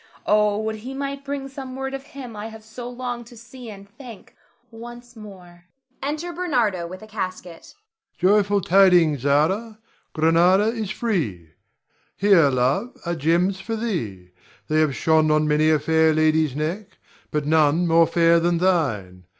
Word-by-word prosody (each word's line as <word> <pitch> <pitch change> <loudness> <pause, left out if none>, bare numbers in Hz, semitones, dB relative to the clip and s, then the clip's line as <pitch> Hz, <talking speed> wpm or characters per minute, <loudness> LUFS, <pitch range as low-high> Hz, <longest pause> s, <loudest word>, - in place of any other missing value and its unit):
Oh, 210 -1 +2
would 220 0 -3
he 255 +5 -8
might 275 0 -5
bring 280 -1 -5
some 265 -1 -8
word 270 0 -5
of 270 - -5
him 270 -4 -10
I 210 +1 -6
have 220 -1 -12
so 235 +3 -9
longed 245 -1 -6
to 240 - -15
see 240 +1 -12
and 200 -1 -11
thank 230 0 -13 0.4
once 240 +2 -11
more! 180 -5 -13 0.4
[Enter 310 +5 -4
Bernardo 240 - -1
with 185 +4 -10
a - - -12
casket. 185 -5 -7 0.4
Ber. 185 - +3
Joyful 200 0 0
tidings, 175 -5 +4
Zara! 165 - 0 0.4
Grenada 175 +6 +3
is 225 -3 -4
free. 150 - -3 0.7
Here, 195 -7 +5
love, 135 - -1
are 170 - -1
gems 175 +5 +1
for 225 +4 -4
thee; 115 - -4 0.4
they 155 0 +2
have 150 -4 +1
shone 160 -1 +2
on 155 0 +2
many 150 +1 +2
a 155 - +4
fair 160 +1 +2
lady's 155 -3 +2
neck, 185 +6 -4 0.3
but 150 -1 -2
none 155 +2 +3
more 165 0 +4
fair 170 0 +3
than 170 +1 +1
thine. 110 - -1
190 Hz, 160 wpm, -22 LUFS, 160-230 Hz, 0.7 s, Here